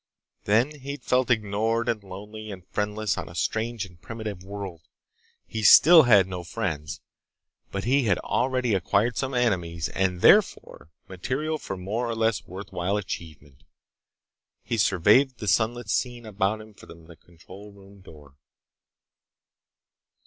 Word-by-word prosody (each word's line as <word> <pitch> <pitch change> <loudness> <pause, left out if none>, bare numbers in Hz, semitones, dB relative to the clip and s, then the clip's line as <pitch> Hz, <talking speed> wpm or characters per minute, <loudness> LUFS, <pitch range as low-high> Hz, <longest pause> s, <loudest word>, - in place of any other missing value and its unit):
Then 120 +9 +1
he'd 140 +2 -7
felt 125 0 +1
ignored 110 +1 0
and 115 -3 -1
lonely 105 +3 -9
and 95 -3 -9
friendless 105 +1 -2
on - - -7
a 85 - -12
strange 110 +4 -2
and 90 -3 -18
primitive 110 -5 -7
world. 95 -4 -7 0.6
He 110 - -5
still 160 - +8
had 100 -4 +7
no 90 -2 -6
friends, 80 -6 -4 0.7
but 100 0 -4
he 130 +2 +2
had 100 -5 +2
already 125 -2 -1
acquired 100 +5 +1
some 130 +1 -2
enemies 90 -9 -1
and 90 -2 -1
therefore - - +3 0.2
material 140 - -3
for 95 - -6
more 110 +6 -3
or 115 - -2
less 110 -1 0
worthwhile 95 +1 -3
achievement. 80 -8 -8 1.0
He 115 - -3
surveyed 105 +7 +3
the 105 - -7
sunlit 115 +3 +1
scene 120 +3 -2
about 105 0 -1
him 110 0 -14
from 85 -4 -15
the 85 0 -14
control 95 +5 -15
room 100 0 -17
door. 75 -5 -16
105 Hz, 140 wpm, -25 LUFS, 95-115 Hz, 1.0 s, still